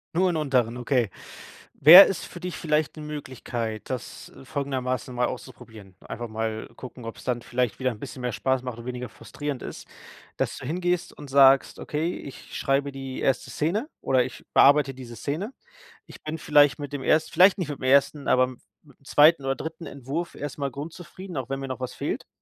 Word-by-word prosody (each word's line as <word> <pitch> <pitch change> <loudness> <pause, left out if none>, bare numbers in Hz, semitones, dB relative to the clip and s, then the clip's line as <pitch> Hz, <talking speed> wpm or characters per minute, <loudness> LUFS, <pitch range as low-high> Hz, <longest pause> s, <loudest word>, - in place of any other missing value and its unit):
Nur 185 +2 +3
'n 165 - -1
unteren, 125 -6 +1
okay. 125 -3 +1 0.7
Wäre 175 +7 +11
es 190 - -3
für 175 - -10
dich 180 0 -5
vielleicht 155 -1 0
'ne 155 - -7
Möglichkeit, 120 -6 -5
das, 125 -3 -6
äh, 135 - -13
folgendermaßen 130 -3 -3
mal 125 0 +1
auszuprobieren. 110 -6 -9
Einfach 120 - -6
mal 110 0 -4
gucken, 125 -1 -10
ob's 115 - -8
dann 125 -1 -1
vielleicht 120 -2 -2
wieder 130 -1 0
'n 105 - -12
bisschen 130 - -8
mehr 125 -2 -2
Spaß 130 +2 0
macht 125 -2 -5
und 120 - -9
weniger 125 -1 -5
frustrierend 145 +4 -6
ist. - - -8 0.5
Dass - - -2
du - - -8
hingehst 175 +2 -1
und 145 -2 -10
sagst: 135 0 +5
„Okay, 160 +4 -2
ich 140 - -10
schreibe 140 +1 +1
die 135 -1 -6
1. 135 - 0
Szene 200 - -1
oder 130 -2 +2
ich 130 - -9
bearbeite 140 -1 +6
diese 125 -2 -10
Szene. 155 - -4 0.5
Ich - - -14
bin 155 +1 -5
vielleicht 145 -2 +4
mit 145 -1 -7
dem 140 - -3
erst 155 +4 +2
vielleicht 185 +4 +6
nicht 170 -5 -3
mit 145 - -5
dem - - -10
1., 140 +2 +3
aber 130 0 +4
m 125 -1 -4 0.2
mit 140 -4 -22
dem 140 - -28
2. 150 0 +5
oder 135 0 0
3. 160 +1 -7
Entwurf 140 +6 -5
erstmal 140 -1 -4
grundzufrieden, 170 +5 -8
auch 130 -1 -4
wenn 135 0 -2
mir 135 - -5
noch 130 0 -5
was 125 - -5
fehlt?“ - - -4
135 Hz, 200 wpm, -25 LUFS, 125-150 Hz, 0.7 s, Wäre